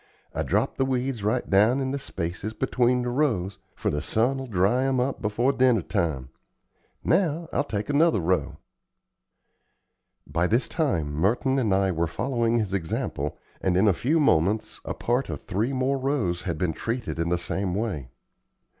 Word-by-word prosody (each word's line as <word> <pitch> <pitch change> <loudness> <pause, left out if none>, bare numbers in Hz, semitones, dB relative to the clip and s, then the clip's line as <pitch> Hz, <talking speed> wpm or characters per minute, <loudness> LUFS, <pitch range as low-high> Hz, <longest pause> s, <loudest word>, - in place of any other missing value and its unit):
I - - -2
drop - - 0
the - - +2
weeds 130 -2 -1
right 110 +4 0
down 110 +7 +4
in 130 -1 -1
the 140 - -2
spaces 95 -2 -4
between 125 +1 +1
the 125 - -1
rows, 110 -9 0 0.2
for - - -1
the 75 0 -1
sun 120 +10 +1
will 135 - -6
dry 105 +4 +2
'em 135 -1 +1
up 130 +2 -1
before 115 +6 +1
dinner 125 -8 +3
time. 80 - -1 0.7
Now 170 -2 +1
I'll - - +2
take 105 -7 -3
another 145 -4 +3
row." 90 +2 0 1.7
By 90 +2 0
this 115 +6 +1
time 85 - -1
Merton 115 - +1
and 110 -6 +1
I 95 0 +3
were 85 -1 0
following 120 +4 0
his 105 -4 -1
example, 80 -5 -2 0.2
and 90 -1 +1
in 100 +3 +4
a 100 - +5
few 145 - +1
moments 105 - +2
a - - -3
part 125 +3 0
of - - -4
three 110 +8 -1
more 135 +1 0
rows 130 -11 0
had 85 -4 -3
been 85 0 0
treated 115 -4 -3
in 85 0 0
the 90 - +2
same 90 +2 -2
way. 95 - -3
110 Hz, 175 wpm, -26 LUFS, 90-130 Hz, 1.7 s, a